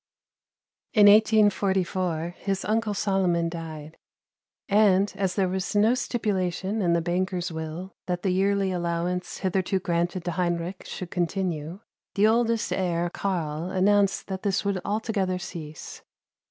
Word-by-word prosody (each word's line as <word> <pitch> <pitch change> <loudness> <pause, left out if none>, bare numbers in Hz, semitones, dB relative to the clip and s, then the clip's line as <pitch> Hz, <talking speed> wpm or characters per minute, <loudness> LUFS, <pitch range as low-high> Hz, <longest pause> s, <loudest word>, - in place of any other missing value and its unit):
In 210 -3 +6
1844 190 -5 +3
his 195 -1 -2
uncle 215 -1 0
Solomon 185 -4 +1
died; 160 -2 -8 0.7
and, 200 -1 +4
as 195 -2 -1
there 195 -2 +2
was 190 +2 -3
no 215 +3 +5
stipulation 205 -5 -1
in 175 -3 +2
the 170 -1 +1
banker's 180 +1 -1
will 160 +4 -6
that 180 0 -2
the 190 - +1
yearly 195 +1 +1
allowance 175 0 -2
hitherto 190 0 0
granted 175 0 -1
to 175 - -1
Heinrich 175 +1 -2
should 180 -2 -6
continue, 175 -1 -2 0.3
the 205 +1 +4
oldest 230 0 +2
heir 175 -2 -1
Karl 170 -4 -2
announced 200 +1 +2
that 190 -1 -5
this 200 0 0
would 195 -2 0
altogether 205 -3 -1
cease. 160 -4 -8
185 Hz, 130 wpm, -26 LUFS, 175-200 Hz, 0.7 s, In